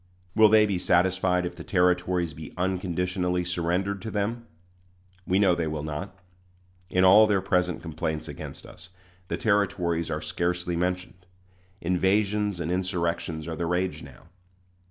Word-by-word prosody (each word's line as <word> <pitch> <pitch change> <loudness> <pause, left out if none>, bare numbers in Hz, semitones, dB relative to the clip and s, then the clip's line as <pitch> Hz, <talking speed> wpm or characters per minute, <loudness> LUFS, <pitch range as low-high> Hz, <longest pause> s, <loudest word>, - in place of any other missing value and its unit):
Will 110 -1 +7
they 110 0 +6
be 100 -4 -1
satisfied 90 0 +2
if 90 - -5
the - - -8
Territories 90 -2 +1
be 80 0 -10
unconditionally 90 0 -1
surrendered 90 +3 -1
to 110 - -5
them? 115 +3 -2 0.8
We 95 - +2
know 100 -3 +4
they 85 -2 -1
will 75 -1 -3
not. 80 +6 -5 0.7
In 90 0 +2
all 105 +4 +8
their 100 -2 +2
present 90 -2 0
complaints 80 -1 -3
against 75 - -8
us, 90 - -12 0.4
the - - -2
Territories 95 -6 0
are - - -2
scarcely 90 0 -2
mentioned. 90 +1 -3 0.5
Invasions 100 +2 +1
and 85 0 -2
insurrections 85 -3 -2
are 80 - -4
the 85 0 -2
rage 90 +2 -1
now. - - -13
90 Hz, 145 wpm, -26 LUFS, 85-95 Hz, 0.8 s, all